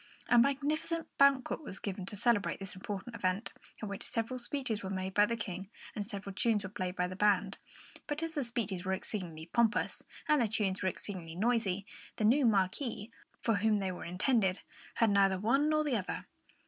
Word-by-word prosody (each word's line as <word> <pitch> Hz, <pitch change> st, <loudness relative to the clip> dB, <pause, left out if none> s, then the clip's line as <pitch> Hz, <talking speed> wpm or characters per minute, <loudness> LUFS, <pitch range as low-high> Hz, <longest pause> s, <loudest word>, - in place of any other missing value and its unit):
A 240 Hz, 0 st, +7 dB
magnificent 300 Hz, +5 st, 0 dB
banquet 275 Hz, 0 st, +4 dB
was 225 Hz, -10 st, -7 dB
given 190 Hz, -2 st, -5 dB
to 205 Hz, -, -4 dB
celebrate 205 Hz, 0 st, +2 dB
this 195 Hz, -1 st, -4 dB
important 200 Hz, +3 st, -6 dB
event, 185 Hz, +2 st, -1 dB, 0.3 s
at -, -, -2 dB
which 200 Hz, -1 st, -5 dB
several 230 Hz, +3 st, -2 dB
speeches 240 Hz, -4 st, -2 dB
were 190 Hz, -, -4 dB
made 190 Hz, 0 st, -3 dB
by 205 Hz, +1 st, +5 dB
the 230 Hz, -, -1 dB
King 190 Hz, -3 st, -5 dB, 0.3 s
and 210 Hz, -, -1 dB
several 200 Hz, -2 st, -6 dB
tunes 210 Hz, +1 st, +2 dB
were 190 Hz, -, -6 dB
played 185 Hz, -3 st, -3 dB
by 180 Hz, 0 st, +1 dB
the 185 Hz, -, -6 dB
band; 200 Hz, 0 st, +2 dB, 0.5 s
but 295 Hz, +2 st, -2 dB
as 330 Hz, -, -2 dB
the 295 Hz, -4 st, -1 dB
speeches 225 Hz, -7 st, -3 dB
were 190 Hz, 0 st, 0 dB
exceedingly 180 Hz, -5 st, -4 dB
pompous 235 Hz, -1 st, +2 dB, 0.3 s
and 300 Hz, -3 st, +4 dB
the 230 Hz, -, +3 dB
tunes 205 Hz, -3 st, 0 dB
were 190 Hz, -, +2 dB
exceedingly 175 Hz, -4 st, -6 dB
noisy, 205 Hz, -2 st, +1 dB, 0.3 s
the -, -, -2 dB
new 255 Hz, +4 st, +5 dB
Marquis, 210 Hz, +2 st, 0 dB, 0.3 s
for 225 Hz, -3 st, +3 dB
whom 215 Hz, +2 st, +3 dB
they 190 Hz, -2 st, -1 dB
were 180 Hz, -, -7 dB
intended, 190 Hz, +2 st, +1 dB, 0.3 s
heard 225 Hz, -2 st, +4 dB
neither 195 Hz, -1 st, +4 dB
one 270 Hz, +10 st, +3 dB
nor 305 Hz, 0 st, +3 dB
the 280 Hz, -6 st, +1 dB
other. 190 Hz, -, -4 dB
210 Hz, 195 wpm, -33 LUFS, 190-240 Hz, 0.5 s, A